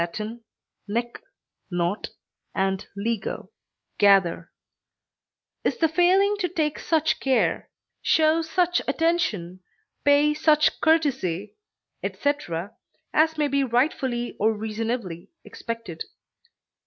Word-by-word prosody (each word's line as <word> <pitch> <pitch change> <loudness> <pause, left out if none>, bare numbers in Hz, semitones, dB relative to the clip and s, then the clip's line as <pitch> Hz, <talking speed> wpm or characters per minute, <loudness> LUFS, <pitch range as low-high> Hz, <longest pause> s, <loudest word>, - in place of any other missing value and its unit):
nec, 235 +3 -2 0.6
not, 175 +2 -1 0.5
and 190 0 0
lego, 215 0 -3 0.5
gather) 195 -4 +4 1.1
is - - 0
the 325 - +3
failing 370 +5 +3
to 365 -3 -1
take 310 -3 -1
such 315 -1 +1
care, 265 -1 +1 0.3
show 315 +1 +3
such 355 +2 +1
attention, 275 - 0 0.4
pay 290 +1 +4
such 305 0 +3
courtesy, 260 - +1 0.5
etc., 205 - -2 0.4
as 320 +1 +3
may 300 -1 +2
be 280 0 +1
rightfully 245 -1 0
or 220 +2 +3
reasonably 220 -4 -4 0.2
expected. 230 -8 -6
260 Hz, 90 wpm, -25 LUFS, 205-315 Hz, 1.1 s, gather